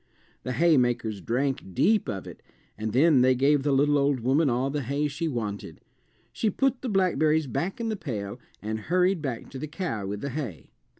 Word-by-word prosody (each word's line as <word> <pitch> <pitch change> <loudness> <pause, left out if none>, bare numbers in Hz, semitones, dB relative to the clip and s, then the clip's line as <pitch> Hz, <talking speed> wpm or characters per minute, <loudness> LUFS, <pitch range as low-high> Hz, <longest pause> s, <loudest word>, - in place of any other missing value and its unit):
The 125 - -4
haymakers 120 - +2
drank 125 -4 -2
deep 215 0 +3
of 95 -2 -4
it - - -11 0.3
and 110 +1 -3
then 140 +3 +5
they 130 0 +4
gave 140 +3 +3
the 145 +1 0
little 145 +2 +3
old 140 -2 +1
woman 135 +5 +3
all 130 +3 0
the 145 0 -2
hay 140 +4 -1
she 145 +3 -3
wanted. 110 -8 -4 0.5
She 220 - 0
put 270 +4 0
the 255 - -3
blackberries 160 -6 +2
back 155 - -3
in 230 -1 -2
the 220 - -1
pail 120 - -5 0.2
and 110 +1 -3
hurried 180 - +1
back 130 -6 -5
to 130 - -7
the 155 - -4
cow 150 - -4
with 100 +1 -4
the 140 - -3
hay. 125 - -6
140 Hz, 195 wpm, -27 LUFS, 120-160 Hz, 0.5 s, then